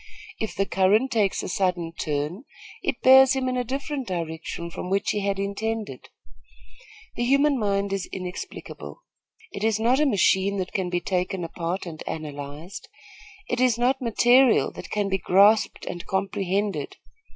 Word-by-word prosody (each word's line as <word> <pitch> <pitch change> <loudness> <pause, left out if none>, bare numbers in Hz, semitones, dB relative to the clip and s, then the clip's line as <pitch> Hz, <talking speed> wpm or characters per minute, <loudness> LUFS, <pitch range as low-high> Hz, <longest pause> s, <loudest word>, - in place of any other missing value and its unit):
If 220 - -3
the 195 - +1
current 205 +8 +2
takes 210 -5 +1
a - - -4
sudden 180 -3 -1
turn, 155 - -3 0.4
it - - -3
bears 265 +1 +8
him 260 -1 -1
in 255 - -1
a 250 - 0
different 275 +2 -4
direction 170 -1 -5
from 180 - -6
which 195 +1 +1
he 210 - -1
had 200 -1 -1
intended. 200 - -4 1.1
The 240 - -1
human 275 +2 +3
mind 200 -1 0
is 195 -2 -3
inexplicable. 185 - -7 0.5
It 200 - -6
is 220 -1 +2
not 240 +4 +3
a 300 - +3
machine 200 -3 +2
that 185 -1 -3
can 185 -2 -1
be 175 0 -1
taken 180 0 -2
apart 170 +3 -4
and 160 -3 -8
analyzed. 150 +4 -7 0.6
It 245 0 -1
is 250 -3 +3
not 255 +3 +1
material 245 +1 +4
that - - -10
can 205 -1 -1
be 195 0 0
grasped 200 +5 +3
and 175 - -5
comprehended. 195 +1 -2
200 Hz, 160 wpm, -25 LUFS, 180-235 Hz, 1.1 s, bears